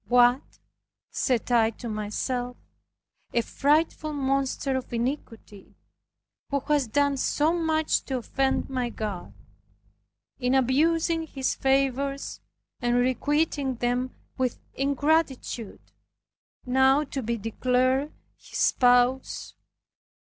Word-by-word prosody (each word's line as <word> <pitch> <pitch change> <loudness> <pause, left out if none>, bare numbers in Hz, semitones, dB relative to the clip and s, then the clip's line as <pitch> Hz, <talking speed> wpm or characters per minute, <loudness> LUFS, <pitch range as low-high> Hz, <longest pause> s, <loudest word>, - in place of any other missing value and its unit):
"What 245 +2 +5 0.7
(said 250 -2 0
I 230 -2 +4
to 235 +2 -8
myself) 245 +4 -3 0.8
a 235 - +4
frightful 305 +3 +1
monster 275 -1 0
of 260 - -4
iniquity, 235 -4 -5 0.7
who 280 - +1
has 290 -3 +1
done 285 +4 +1
so 300 +4 +1
much 320 -2 +1
to 265 - -2
offend 265 +2 0
my 255 -3 -2
God, 210 -6 -5 1.1
in 250 +1 +1
abusing 320 +5 +2
His 265 -3 -1
favors, 275 +1 0 0.4
and 240 0 +1
requiting 270 +2 +1
them 245 +2 -1 0.2
with 255 -2 0 0.2
ingratitude, 280 -5 -1 0.7
now 265 +3 +4
to 275 -2 -5
be 235 0 -2
declared 255 +5 +1 0.3
his - - -9
spouse!" 245 +1 +2
265 Hz, 100 wpm, -26 LUFS, 245-285 Hz, 1.1 s, What